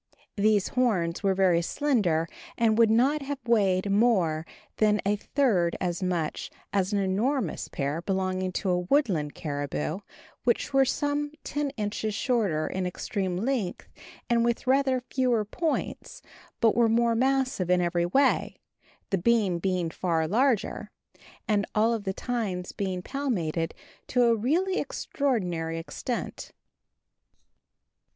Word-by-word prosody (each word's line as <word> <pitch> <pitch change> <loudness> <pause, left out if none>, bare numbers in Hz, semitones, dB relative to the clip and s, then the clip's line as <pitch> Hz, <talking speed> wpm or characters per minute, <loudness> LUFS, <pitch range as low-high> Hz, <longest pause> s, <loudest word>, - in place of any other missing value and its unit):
These 210 -1 +2
horns 190 -10 0
were 195 -1 +2
very 185 -3 +3
slender, 180 - +1 0.3
and 225 -2 +3
would 230 -1 +6
not 265 +7 +3
have 280 +1 -4
weighed 200 -4 +2
more 190 -8 +2 0.3
than 215 -1 +3
a 205 +1 +2
third 205 -7 +1
as 175 0 -2
much 175 -4 -2 0.2
as 195 -1 +1
an 205 - +1
enormous 200 - 0
pair 145 +4 -3
belonging 185 0 -1
to 190 0 -1
a 180 - +2
woodland 180 - +1
caribou, 145 +3 -3 0.4
which 245 +4 0
were 270 0 +5
some 290 +2 -1
10 290 -1 -2
inches 210 0 -2
shorter 205 - 0
in 185 -1 -2
extreme 185 0 -3
length, 225 -3 -2 0.4
and 235 -1 +2
with 235 +2 0
rather 265 -1 +2
fewer 250 -3 0
points, 315 +9 -3 0.4
but 225 -2 +5
were 235 -1 +4
more 235 +1 +3
massive 260 -5 +1
in 180 0 +4
every 175 0 +1
way, 265 +9 +2 0.6
the 195 - +1
beam 200 -3 +2
being 180 -2 -1
far 165 -2 0
larger, 235 - +1 0.6
and 210 -2 +2
all 220 +2 +3
of 220 -3 -4
the 190 - 0
tines 200 -7 -3
being 185 -2 -3
palmated 175 - -2 0.3
to 250 -1 +2
a 235 -1 +4
really 340 - +1
extraordinary 180 - -2
extent. 230 +8 -5
205 Hz, 135 wpm, -27 LUFS, 180-245 Hz, 0.6 s, would